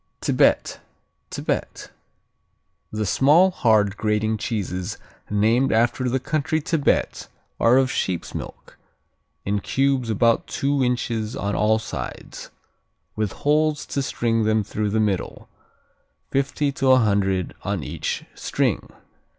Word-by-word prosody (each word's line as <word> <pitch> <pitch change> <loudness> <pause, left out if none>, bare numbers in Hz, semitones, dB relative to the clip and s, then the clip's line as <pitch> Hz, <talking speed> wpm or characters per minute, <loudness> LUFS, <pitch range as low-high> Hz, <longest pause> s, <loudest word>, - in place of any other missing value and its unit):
Tibet - - +2 0.5
Tibet - - -4 1.0
The 110 0 -2
small, 150 - +4
hard, 105 - +2
grating 110 0 0
cheeses 100 -3 -3 0.3
named 110 +6 +2
after 120 +3 +1
the 130 +2 0
country 155 +3 -1
Tibet, 155 -1 0 0.3
are 120 +2 +5
of 130 -1 +2
sheep's 90 -3 -2
milk, - - -9 0.7
in 100 +1 0
cubes 135 +1 0
about 115 +2 +2
two 140 0 0
inches 120 -2 -1
on 100 0 -2
all 110 +1 +3
sides, 110 - -7 0.7
with 105 -2 -2
holes 150 +1 +2
to 140 - -2
string 115 -4 0
them 110 0 +2
through 105 +1 -2
the 110 +2 0
middle, 100 -4 -2 0.8
fifty 140 +1 0
to 135 -1 0
a - - +6
hundred 100 -5 +1
on - - -3
each - - -4
string. - - -1
115 Hz, 120 wpm, -23 LUFS, 105-135 Hz, 1.0 s, a